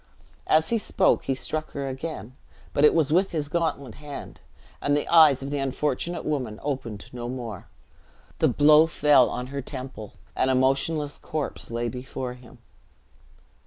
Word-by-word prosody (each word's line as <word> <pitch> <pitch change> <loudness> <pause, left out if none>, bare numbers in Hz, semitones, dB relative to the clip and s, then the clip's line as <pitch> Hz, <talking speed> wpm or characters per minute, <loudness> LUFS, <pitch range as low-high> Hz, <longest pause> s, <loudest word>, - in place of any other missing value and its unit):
As 155 +1 +3
he 230 - +2
spoke, - - +2
he 135 - 0
struck 155 +4 -3
her 140 -1 -3
again; 130 -2 -6 0.4
but 140 - +1
it 150 - +6
was 155 -2 +2
with 185 +2 +2
his 150 -3 -2
gauntlet 145 -7 -2
hand, 145 -1 -9 0.4
and 145 0 +2
the 145 - -2
eyes 155 -5 +6
of 140 - -5
the 145 - -1
unfortunate 145 +5 -2
woman 130 -8 -2
opened 120 -8 -4
no 120 -1 -5
more. 120 -6 -6 0.7
The - - +4
blow 150 +2 +6
fell 145 -5 +4
on 125 - -4
her 140 - -2
temple, 130 -5 -7 0.2
and 130 - +1
a 130 - +3
motionless 140 +3 +1
corpse 155 -2 -4
lay 120 +1 -2
before 125 0 -5
him. 125 -1 -16
140 Hz, 165 wpm, -25 LUFS, 125-155 Hz, 0.7 s, it